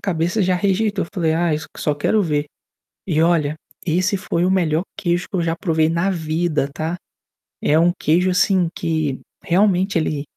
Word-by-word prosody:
cabeça 175 Hz, +2 st, 0 dB
já 185 Hz, 0 st, +2 dB
rejeitou. 200 Hz, +2 st, 0 dB
Eu -, -, -14 dB
falei: 165 Hz, -5 st, 0 dB
"Ai, 170 Hz, -1 st, +1 dB
s 155 Hz, -, -7 dB
só 150 Hz, -, 0 dB
quero 205 Hz, +9 st, +1 dB
ver". 150 Hz, -4 st, 0 dB, 0.6 s
E 160 Hz, -4 st, +2 dB
olha, 160 Hz, -3 st, +2 dB, 0.3 s
esse 185 Hz, +4 st, +1 dB
foi 175 Hz, -2 st, -1 dB
o 185 Hz, -, +2 dB
melhor 170 Hz, -4 st, +1 dB
queijo 175 Hz, -1 st, -1 dB
que -, -, -2 dB
eu 175 Hz, -, +1 dB
já 165 Hz, 0 st, 0 dB
provei 160 Hz, -3 st, +1 dB
na 170 Hz, +4 st, 0 dB
vida, 160 Hz, -3 st, -1 dB
tá? 160 Hz, +3 st, -3 dB, 0.7 s
É 155 Hz, +2 st, +3 dB
um 170 Hz, +1 st, +4 dB
queijo, 175 Hz, +4 st, +2 dB
assim, 185 Hz, -1 st, +2 dB
que 160 Hz, -5 st, -1 dB, 0.2 s
realmente 190 Hz, 0 st, +2 dB
ele 155 Hz, -3 st, -1 dB
170 Hz, 180 wpm, -20 LUFS, 160-185 Hz, 0.7 s, um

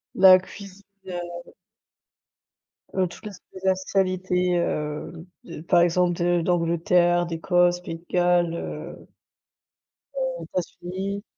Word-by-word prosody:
la 185 Hz, -1 st, +8 dB
cuisine, 195 Hz, +1 st, -12 dB, 0.2 s
heu 175 Hz, -1 st, -7 dB, 1.4 s
heu, 190 Hz, -1 st, +1 dB
toutes 175 Hz, -, -13 dB
les 190 Hz, -1 st, -3 dB
spécialités, 185 Hz, -1 st, 0 dB
heu, 155 Hz, 0 st, -3 dB, 0.2 s
de 170 Hz, -3 st, -9 dB
par 170 Hz, +1 st, +3 dB
exemple 175 Hz, 0 st, +2 dB
de 175 Hz, 0 st, +2 dB
d'Angleterre, 175 Hz, +1 st, +2 dB
d'Écosse, 175 Hz, +1 st, +2 dB
Pays 165 Hz, -2 st, -6 dB
de 170 Hz, -, -26 dB
Galles, 175 Hz, -1 st, +2 dB
heu -, -, -7 dB, 1.1 s
heu, -, -, -3 dB
États-Unis. 190 Hz, +3 st, -5 dB
175 Hz, 105 wpm, -24 LUFS, 175-185 Hz, 1.4 s, la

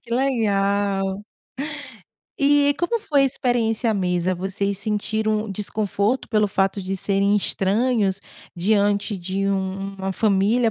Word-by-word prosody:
Que 235 Hz, -, -18 dB
legal. 200 Hz, -5 st, 0 dB, 1.2 s
E 285 Hz, 0 st, +4 dB
como 460 Hz, +7 st, 0 dB
foi 285 Hz, -7 st, +2 dB
a -, -, +4 dB
experiência 240 Hz, -3 st, 0 dB
à -, -, 0 dB
mesa, 180 Hz, -1 st, 0 dB
vocês 195 Hz, +2 st, -2 dB
sentiram 215 Hz, 0 st, -1 dB
desconforto, 210 Hz, +3 st, -1 dB
pelo 215 Hz, -2 st, +2 dB
fato 195 Hz, +1 st, 0 dB
de 190 Hz, +1 st, -3 dB
serem 200 Hz, +1 st, +1 dB
estranhos, 200 Hz, 0 st, +1 dB, 0.4 s
diante 205 Hz, +2 st, +1 dB
de 190 Hz, +2 st, -2 dB
u 200 Hz, -, +2 dB, 0.4 s
uma 190 Hz, 0 st, -2 dB
família, 215 Hz, +4 st, +2 dB
205 Hz, 125 wpm, -22 LUFS, 195-225 Hz, 1.2 s, E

